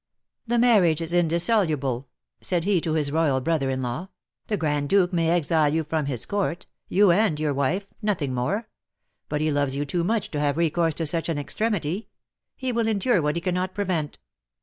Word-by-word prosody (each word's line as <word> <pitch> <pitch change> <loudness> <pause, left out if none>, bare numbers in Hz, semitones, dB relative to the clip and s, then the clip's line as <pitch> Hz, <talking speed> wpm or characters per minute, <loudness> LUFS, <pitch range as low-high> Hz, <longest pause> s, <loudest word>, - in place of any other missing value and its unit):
"The 240 +1 +1
marriage 210 -10 +4
is 165 0 -3
indissoluble," 165 - +1 0.3
said 175 -3 0
he 190 -2 +2
to 160 - -1
his 150 -3 0
royal 150 -4 +2
brother 140 0 0
in 130 0 -2
law; 125 +10 -4 0.4
"the 210 - -1
Grand 150 -4 -1
Duke 195 -2 +3
may 165 -2 +2
exile 160 -3 +2
you 160 +1 0
from 155 -1 -2
his 125 -5 -1
court, 190 -5 -2 0.2
you 200 -1 +4
and 180 -4 +2
your 150 -2 0
wife, 140 +9 0 0.2
nothing 170 - -1
more; 195 - -1 0.6
but 150 0 -1
he 155 0 +1
loves 145 -2 0
you 145 +1 -1
too 170 +4 -1
much 220 +4 -1
to 150 - -2
have 145 0 0
recourse 165 -1 +1
to 165 - -1
such 165 +2 -1
an 160 - -1
extremity. 195 +3 -2 0.5
He 260 -1 -2
will 230 -1 0
endure 215 -2 +2
what 150 0 0
he 170 - -2
cannot 180 +1 -2
prevent." 180 -7 -2
165 Hz, 195 wpm, -25 LUFS, 145-190 Hz, 0.6 s, marriage